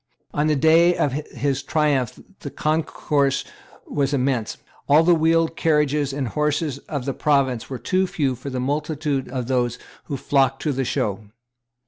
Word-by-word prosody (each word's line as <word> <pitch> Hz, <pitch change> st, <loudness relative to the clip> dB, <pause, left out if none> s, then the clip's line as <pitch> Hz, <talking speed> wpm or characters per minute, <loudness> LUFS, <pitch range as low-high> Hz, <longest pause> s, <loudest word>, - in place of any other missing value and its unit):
On 150 Hz, +1 st, +1 dB
the 155 Hz, -, +2 dB
day 165 Hz, +4 st, +5 dB
of 145 Hz, -, +1 dB
his 140 Hz, -1 st, -2 dB
triumph 140 Hz, -3 st, 0 dB, 0.2 s
the 160 Hz, -8 st, -6 dB
concourse 150 Hz, -3 st, 0 dB, 0.4 s
was 140 Hz, 0 st, 0 dB
immense. 125 Hz, -4 st, -1 dB, 0.3 s
All 150 Hz, +3 st, +6 dB
the 175 Hz, +1 st, +5 dB
wheeled 165 Hz, 0 st, +2 dB
carriages 150 Hz, -3 st, +1 dB
and 135 Hz, -3 st, -3 dB
horses 150 Hz, 0 st, -1 dB
of 140 Hz, -5 st, -3 dB
the 135 Hz, -, -1 dB
province 135 Hz, -6 st, +1 dB
were 130 Hz, -, -4 dB
too 185 Hz, +7 st, 0 dB
few 140 Hz, -7 st, 0 dB
for 130 Hz, +3 st, -7 dB
the 130 Hz, -1 st, -3 dB
multitude 145 Hz, +1 st, -2 dB
of 125 Hz, -1 st, -4 dB
those 120 Hz, -2 st, 0 dB, 0.3 s
who 140 Hz, -, -4 dB
flocked 135 Hz, 0 st, +1 dB
to 150 Hz, -, +1 dB
the 135 Hz, -1 st, -1 dB
show. 110 Hz, -5 st, -2 dB
140 Hz, 160 wpm, -22 LUFS, 130-155 Hz, 0.4 s, All